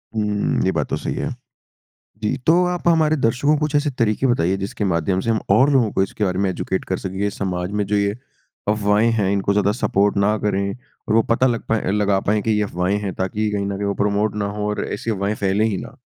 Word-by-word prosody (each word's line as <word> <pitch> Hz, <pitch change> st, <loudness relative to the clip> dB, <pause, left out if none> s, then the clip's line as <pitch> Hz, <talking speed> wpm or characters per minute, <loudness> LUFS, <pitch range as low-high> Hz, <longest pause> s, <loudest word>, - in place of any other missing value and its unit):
हुँ, 105 Hz, -1 st, 0 dB
ये -, -, +2 dB
बात -, -, -1 dB
तो -, -, -1 dB
सही -, -, -3 dB
है। -, -, -2 dB, 0.9 s
जी, 110 Hz, +5 st, 0 dB
तो 165 Hz, +7 st, +3 dB
आप 180 Hz, -1 st, -2 dB
हमारे 160 Hz, -2 st, +4 dB
दर्शकों 135 Hz, +2 st, +2 dB
को -, -, -2 dB
कुछ 150 Hz, -1 st, -1 dB
ऐसे 145 Hz, +1 st, +2 dB
तरीके 115 Hz, +3 st, +2 dB
बताइए, 95 Hz, -7 st, +2 dB
जिसके 100 Hz, +2 st, -4 dB
माध्यम 90 Hz, +1 st, 0 dB
से 115 Hz, -, -3 dB
हम 110 Hz, -, +2 dB
और 135 Hz, +3 st, +5 dB
लोगों 120 Hz, -6 st, +3 dB
को 95 Hz, -, +2 dB
इसके 100 Hz, +2 st, -4 dB
बारे 90 Hz, -1 st, 0 dB
में 100 Hz, -1 st, +1 dB
एजुकेट 95 Hz, +1 st, -3 dB
कर 95 Hz, -, -2 dB
सकें। 95 Hz, 0 st, -6 dB
ये 100 Hz, 0 st, +1 dB
समाज 90 Hz, -1 st, -3 dB
में 105 Hz, -1 st, -1 dB
जो 105 Hz, +1 st, -1 dB
ये 100 Hz, +2 st, 0 dB, 0.5 s
अफ़वाहें 105 Hz, +2 st, +2 dB
हैं, 100 Hz, -4 st, +1 dB
इनको 100 Hz, 0 st, +1 dB
ज़्यादा 100 Hz, 0 st, +2 dB
सपोर्ट 100 Hz, -2 st, +1 dB
ना 105 Hz, +2 st, +2 dB
करें 100 Hz, -1 st, -1 dB, 0.4 s
और 105 Hz, -, +1 dB
वो 115 Hz, -, +6 dB
पता 125 Hz, +3 st, +3 dB
लग 120 Hz, -2 st, -1 dB
पाए 110 Hz, -4 st, 0 dB
लगा 100 Hz, -1 st, +2 dB
पाएँ 105 Hz, +2 st, 0 dB
कि 110 Hz, -, 0 dB
ये 105 Hz, 0 st, +2 dB
अफ़वाहें 95 Hz, 0 st, -1 dB
हैं, 100 Hz, -3 st, -3 dB
ताकि 105 Hz, +3 st, -1 dB
कहीं 100 Hz, -1 st, -1 dB
न 100 Hz, 0 st, -2 dB
कहीं 100 Hz, 0 st, -2 dB
वो 100 Hz, -, 0 dB
प्रमोट 105 Hz, +1 st, 0 dB
ना 105 Hz, -1 st, -1 dB
हो 105 Hz, 0 st, -2 dB
और 105 Hz, -, -2 dB
ऐसी 115 Hz, +2 st, -3 dB
अफ़वाहें 100 Hz, +1 st, -1 dB
फैलें 100 Hz, +2 st, +1 dB
ही 105 Hz, -4 st, 0 dB
ना? -, -, -9 dB
105 Hz, 245 wpm, -21 LUFS, 100-115 Hz, 0.9 s, वो